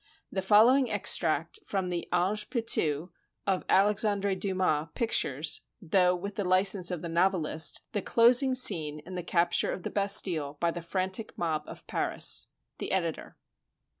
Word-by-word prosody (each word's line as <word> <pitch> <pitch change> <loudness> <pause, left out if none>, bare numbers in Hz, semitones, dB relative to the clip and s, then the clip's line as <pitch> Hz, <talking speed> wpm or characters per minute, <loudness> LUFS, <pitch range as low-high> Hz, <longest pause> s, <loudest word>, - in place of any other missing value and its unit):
The 190 - -2
following 230 +7 +4
extract 435 - -1
from 190 -2 -3
the 175 -1 -4
"Ange 195 +4 0
Pitou" 175 - -1 0.3
of 190 -2 0
Alexandre 200 0 +2
Dumas 185 -5 -1
pictures, 155 - 0 0.2
though 180 -1 +2
with 200 +3 -6
the 205 - -3
li 185 +1 +3
cense 190 -3 +2
of 180 -3 -5
the - - -3
novelist, 165 -2 0
the 205 - -2
closing 245 +5 +4
scene 155 - +3
in 185 - -9
the 180 - -4
capture 170 0 +1
of 180 - -6
the - - -5
Bastille 185 -8 +1
by 170 0 +1
the 175 - -6
frantic 190 +5 -3
mob 155 -3 -2
of - - -11
Paris. - - 0 0.3
The - - -4
Editor. - - -3
185 Hz, 155 wpm, -28 LUFS, 170-205 Hz, 0.3 s, following